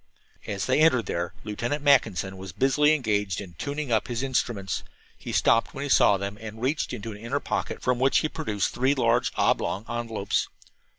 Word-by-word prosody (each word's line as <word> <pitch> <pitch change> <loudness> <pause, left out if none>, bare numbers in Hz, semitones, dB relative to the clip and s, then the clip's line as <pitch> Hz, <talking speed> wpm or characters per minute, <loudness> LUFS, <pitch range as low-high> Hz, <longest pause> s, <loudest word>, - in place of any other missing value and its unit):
As 100 -2 -2
they 130 +3 +2
entered 155 -7 +4
there 85 +1 -3
Lieutenant 120 +7 -3
Mackinson 110 - +3
was 95 -1 -8
busily 150 - +3
engaged 105 - -1
in 95 -4 -8
"tuning 145 -2 -3
up" 110 -2 +2
his 120 +1 -3
instruments. 120 -8 -1 0.3
He - - -8
stopped 115 - +2
when 140 - -4
he 145 - -4
saw 100 -6 +5
them 100 +2 -5
and 110 0 -8
reached 135 +6 -1
into 110 +2 -5
an 105 - -9
inner 120 +6 -2
pocket, - - -3
from 125 -1 +1
which 135 +1 +3
he 155 - +2
produced 105 - -2
three 130 +3 +2
large 120 -1 +2
oblong 100 +3 +1
envelopes. 115 -4 -1
115 Hz, 185 wpm, -26 LUFS, 100-135 Hz, 0.3 s, saw